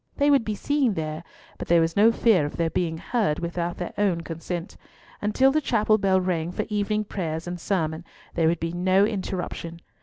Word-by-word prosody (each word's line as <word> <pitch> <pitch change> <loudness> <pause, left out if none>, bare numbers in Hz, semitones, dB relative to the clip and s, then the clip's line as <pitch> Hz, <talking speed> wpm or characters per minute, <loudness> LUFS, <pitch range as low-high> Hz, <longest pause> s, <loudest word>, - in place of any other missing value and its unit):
They 285 0 +4
would 275 -4 +4
be 215 -1 -3
seen 270 -2 +1
there, 155 0 -4 0.4
but - - -5
there 170 0 +5
was 165 0 +1
no 215 +3 +6
fear 225 -7 +3
of 145 - -4
their 165 -1 0
being 165 -3 -1
heard 190 -3 0
without 170 0 -3
their 175 - -5
own 190 -5 +1
consent, 165 +2 -6 0.5
and 210 0 -2
till 270 0 +5
the 310 +2 +1
chapel 215 -5 +2
bell 190 -1 +3
rang 175 -2 -1
for - - -3
evening 210 0 0
prayers 165 -5 -4
and 175 0 -5
sermon 160 -3 -1 0.3
there 165 -2 +2
would 165 0 +1
be 165 0 -2
no 185 +3 +3
interruption. 185 -4 -4
180 Hz, 205 wpm, -25 LUFS, 165-210 Hz, 0.5 s, no